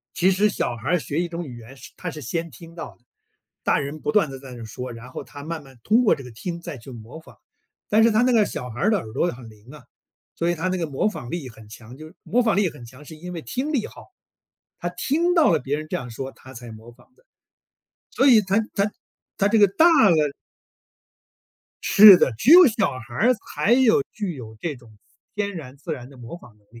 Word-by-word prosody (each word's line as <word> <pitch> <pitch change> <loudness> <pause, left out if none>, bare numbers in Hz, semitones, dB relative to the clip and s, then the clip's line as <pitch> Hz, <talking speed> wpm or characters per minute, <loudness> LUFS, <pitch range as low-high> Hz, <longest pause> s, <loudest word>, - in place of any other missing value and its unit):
其 185 +2 +3
实 200 +3 +3
小 125 -11 -2
孩 120 +6 -5
儿 180 - +3
学 145 +2 -3
一 175 - -2
种 170 0 -5
语 125 -6 -9
言 120 +4 -13
是 - - -13
他 180 - -5
是 155 - -9
先 165 +7 -3
听 165 +6 -14
到 165 - -8
的， 120 - -38 0.6
大 - - +2
人 145 +2 -6
不 225 - -2
断 200 -9 +2
地 135 - -8
在 130 -1 -12
那 120 -2 -9
说， 125 +3 -7
然 115 +2 -11
后 - - -7
他 145 -1 -11
慢 160 0 -5
慢 135 -2 -17
通 225 - +3
过 215 - +4
这 140 - -10
个 125 - -10
听 170 +9 -6
再 150 -5 -8
去 120 +3 -12
模 115 +5 -11
仿。 - - -18 0.5
但 215 +2 +4
是 230 - +5
他 220 - +3
那 250 0 +3
个 220 -3 +4
小 125 - -6
孩 115 - -8
儿 210 - +3
的 215 - +2
耳 110 -10 -8
朵 - - 0
很 120 -2 -12
灵 110 +3 -18
啊， 150 - -13 0.5
所 170 +1 0
以 - - 0
他 175 +3 -2
那 185 0 -1
个 165 - -2
模 145 +7 0
仿 125 - -7
力 165 -6 -5
很 110 -2 -16
强。 115 +3 -12
就 155 +2 -12
模 245 +4 +1
仿 225 -4 +1
力 200 -3 +2
很 125 - -13
强， 130 +5 -15
是 160 +2 -11
因 180 +3 -9
为 170 -2 -6
听 275 - -3
力 255 -7 0
好。 - - -15 0.7
他 - - -3
听 340 +5 0
到 325 -4 +4
了 - - +3
别 135 +3 -2
人 155 0 -8
这 - - -1
样 125 -1 -7
说， 130 +4 -6
他 130 0 -15
才 120 -1 -10
模 110 +2 -13
仿 130 - -24
的。 - - -29 0.9
所 270 - +2
以 235 -5 +7
他 195 0 0 0.2
他 200 +1 +1 0.5
他 200 - +2
这 220 +2 +2
个 205 - +7
大 195 - +3 0.2
了 165 - +4 1.7
是 205 -2 +10
的， 135 - +2
只 165 - 0
有 355 +1 +10
小 220 -5 +1
孩 120 -1 -12
儿 240 - +3
才 215 -1 -2
有 245 - +4
具 200 -5 -4
有 110 -5 -10
这 155 +5 -4
种 120 -4 -18 0.4
天 205 -1 -2
然、 140 -6 -9
自 155 +3 -6
然 125 -4 -7
的 140 - -16
模 120 +1 -10
仿 120 -8 -18
能 - - -30
力。 115 +2 -15
155 Hz, 270 characters per minute, -23 LUFS, 125-205 Hz, 1.7 s, 是